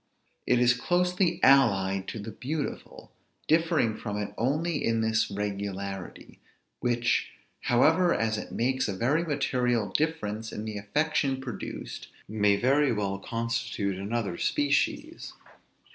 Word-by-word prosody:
It 125 - +4
is 120 0 +5
closely 180 +5 +1
allied 95 -8 +4
to - - -5
the 110 +1 -6
beautiful, 145 +5 -5 0.4
differing 160 -8 +2
from 105 -2 -5
it 105 -1 -4
only 150 +6 0
in 115 -1 +1
this 110 0 +1
regularity; 100 -2 -5 0.4
which, 120 -1 +1 0.3
however, 160 +9 +3
as 110 -5 +1
it 105 - -6
makes 130 +2 0
a 100 - -2
very 145 - +2
material 125 - 0
difference 110 -9 -1
in 105 - -5
the 105 -2 -4
affection 140 +4 0
produced, 130 -3 -6 0.2
may 105 -1 +3
very 135 +6 +3
well 100 -3 -1
constitute 115 -3 -2
another 100 -3 -2
species. 145 -1 0
115 Hz, 125 wpm, -28 LUFS, 105-140 Hz, 0.4 s, is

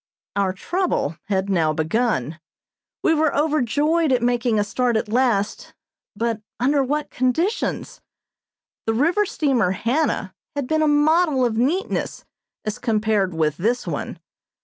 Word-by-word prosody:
Our 200 -2 +1
trouble 340 - -1
had 195 -2 -1
now 165 -5 +2
begun. 160 - -1 0.6
We 325 - +4
were 315 -2 +1
overjoyed 300 +2 +1
at 250 -2 +2
making 240 -2 +1
a 205 - +3
start 235 +2 0
at 220 - -2
last, 225 -4 0 0.4
but 230 0 -1 0.2
under 275 +3 +2
what 295 +3 -2
conditions! 290 - -1 0.9
The 225 - +1
river 345 - +2
steamer 250 - +1
"Hannah" 230 - -1 0.2
had 285 -2 -2
been 315 +4 +1
a 310 - +3
model 295 -2 +3
of 230 -2 0
neatness 305 - -1 0.4
as 215 0 -3
compared 215 -5 0
with 155 -2 0
this 235 +7 0
one. - - -4
245 Hz, 135 wpm, -22 LUFS, 210-295 Hz, 0.9 s, We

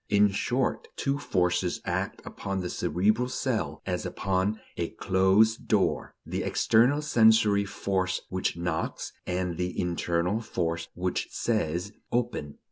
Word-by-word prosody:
In 105 0 +5
short, 125 +6 -1
two 140 +1 -1
forces 90 -5 0
act - - -2
upon 100 -1 -4
the 90 - -3
cerebral 110 +9 +1
cell, 110 - -2
as - - -2
upon 95 +2 -1 0.2
a 85 -1 -2
closed 95 +4 +3
door: - - +1
the - - -3
external 125 +7 +3
sensory 110 -7 +5
force 95 -2 -1
which 95 -2 -1
knocks, 85 -2 -3
and 90 -1 -2
the 90 0 -2
internal 90 +3 0
force 85 -6 -2
which 90 +1 -1
says: 95 -4 -1 0.2
Open. 120 -12 -1
95 Hz, 125 wpm, -28 LUFS, 90-110 Hz, 0.2 s, In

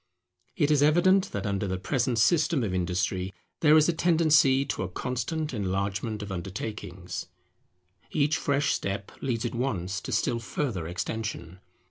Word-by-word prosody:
It 145 - +2
is 145 -2 +4
evident 185 +6 +4
that 100 - -3
under 100 0 -1
the 95 0 -2
present 120 +5 0
system 155 +2 +3
of 100 -4 -2
industry 90 +1 -1 0.3
there 155 0 +6
is 155 - +5
a 175 - +2
tendency 155 -5 +4
to - - -3
a 95 - -2
constant 130 - -3
enlargement 100 +1 -2
of 100 - -7
undertakings: 95 0 -5 0.8
each 150 0 +1
fresh 140 0 +1
step 100 0 -3
leads 120 -3 -1
at 120 - -2
once 95 -7 -2
to - - -6
still 120 - +1
further 115 - -3
extension. 90 -1 -4
115 Hz, 150 wpm, -27 LUFS, 95-150 Hz, 0.8 s, there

